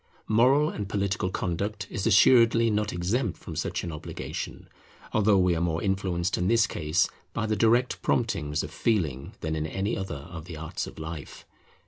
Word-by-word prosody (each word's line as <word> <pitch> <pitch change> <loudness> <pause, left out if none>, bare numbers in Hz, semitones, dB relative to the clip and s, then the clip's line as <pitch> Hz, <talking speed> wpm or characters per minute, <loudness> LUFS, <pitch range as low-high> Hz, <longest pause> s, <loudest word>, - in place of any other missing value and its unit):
Moral 130 +8 +4
and 100 -2 -5
political 100 -2 -1
conduct 100 +5 -2
is 100 -4 -1
assuredly 115 -2 +6
not 105 0 0
exempt 90 - -1
from - - -8
such - - -2
an 85 - -4
obligation, 75 - -6 0.5
although 105 -1 +4
we 90 -2 +3
are 80 - -1
more 85 -1 0
influenced 95 -3 0
in 90 - +1
this 115 -1 +4
case 85 -1 +1 0.3
by 115 - -1
the 110 0 0
direct 115 +4 +2
promptings 80 - 0
of - - -6
feeling 80 - -1
than 80 0 -2
in 80 0 -2
any 95 +6 -2
other 85 -7 -5
of 80 -2 -7
the 85 -3 -8
arts 80 0 -4
of - - -11
life. 80 -1 -7
95 Hz, 175 wpm, -27 LUFS, 80-110 Hz, 0.5 s, assuredly